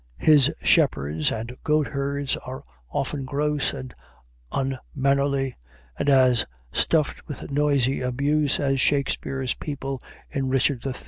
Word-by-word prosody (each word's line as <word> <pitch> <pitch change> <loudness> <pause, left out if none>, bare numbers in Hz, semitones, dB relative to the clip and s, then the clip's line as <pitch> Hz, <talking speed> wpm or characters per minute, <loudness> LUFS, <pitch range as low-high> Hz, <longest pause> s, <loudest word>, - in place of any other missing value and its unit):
His 150 -4 +5
shepherds 75 +2 +2
and 115 +3 -5
goat 150 -1 +2
herds 140 -1 -1
are 130 +1 -8 0.3
often 135 - -2
gross 145 +1 0
and 130 -2 -7 0.6
unmannerly, 135 0 0 0.4
and - - 0
as 130 -4 +4 0.2
stuffed 155 -3 +1
with 145 -1 -7
noisy 140 -3 +2
abuse 140 +3 +1
as 135 -1 +1
Shakespeare's 135 -2 0
people 135 -3 -5 0.3
in 135 -1 -1
"Richard 135 -1 +1
III." 135 - -2
135 Hz, 120 wpm, -24 LUFS, 130-145 Hz, 0.6 s, His